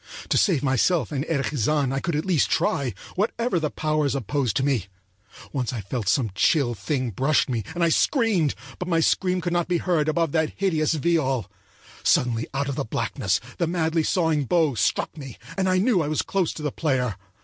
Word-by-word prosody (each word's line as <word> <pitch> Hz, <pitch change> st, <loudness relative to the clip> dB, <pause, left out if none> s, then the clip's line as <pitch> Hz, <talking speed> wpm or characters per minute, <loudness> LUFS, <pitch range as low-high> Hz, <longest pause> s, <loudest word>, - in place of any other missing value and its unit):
To -, -, +2 dB
save 165 Hz, -9 st, +2 dB
myself 135 Hz, -, +2 dB
and 140 Hz, -2 st, -1 dB
Erich 150 Hz, -3 st, -1 dB
Zann 140 Hz, +1 st, +1 dB
I 135 Hz, -, 0 dB
could 165 Hz, +3 st, -2 dB
at 150 Hz, -, -1 dB
least 180 Hz, -6 st, +2 dB
try, 135 Hz, -4 st, 0 dB, 0.2 s
whatever 225 Hz, 0 st, 0 dB
the 155 Hz, -2 st, -1 dB
powers 155 Hz, -2 st, 0 dB
opposed 135 Hz, -1 st, -1 dB
to 135 Hz, -, +1 dB
me. 125 Hz, -10 st, 0 dB, 0.7 s
Once 130 Hz, -3 st, -2 dB
I 120 Hz, -, -3 dB
thought 105 Hz, +1 st, -4 dB
some 115 Hz, -1 st, +1 dB
chill 130 Hz, -, +2 dB
thing 130 Hz, +1 st, -2 dB
brushed 135 Hz, +9 st, +2 dB
me, 120 Hz, -5 st, -2 dB
and 175 Hz, -, 0 dB
I 170 Hz, -, +4 dB
screamed, 200 Hz, -, +2 dB, 0.2 s
but 180 Hz, -, -4 dB
my 165 Hz, -2 st, +2 dB
scream 180 Hz, +2 st, +1 dB
could 175 Hz, 0 st, -2 dB
not 175 Hz, -1 st, +1 dB
be 175 Hz, -1 st, +1 dB
heard 165 Hz, -3 st, +1 dB
above 165 Hz, -1 st, +1 dB
that 160 Hz, -1 st, 0 dB
hideous 160 Hz, -5 st, +1 dB
viol. 135 Hz, -, 0 dB, 0.5 s
Suddenly 115 Hz, -2 st, +2 dB
out 140 Hz, 0 st, -2 dB
of 140 Hz, -, -3 dB
the -, -, 0 dB
blackness 95 Hz, -3 st, -1 dB, 0.2 s
the 170 Hz, -, +1 dB
madly 165 Hz, -1 st, +1 dB
sawing 160 Hz, -3 st, +1 dB
bow 160 Hz, 0 st, +2 dB
struck 105 Hz, +6 st, 0 dB
me, 135 Hz, -5 st, -9 dB, 0.2 s
and 190 Hz, -1 st, +1 dB
I 185 Hz, -, +3 dB
knew 200 Hz, -1 st, +3 dB
I 150 Hz, -, -1 dB
was 155 Hz, 0 st, 0 dB
close 190 Hz, -4 st, 0 dB
to 155 Hz, -, -8 dB
the 150 Hz, -, -1 dB
player. 130 Hz, -, 0 dB
150 Hz, 205 wpm, -24 LUFS, 130-170 Hz, 0.7 s, I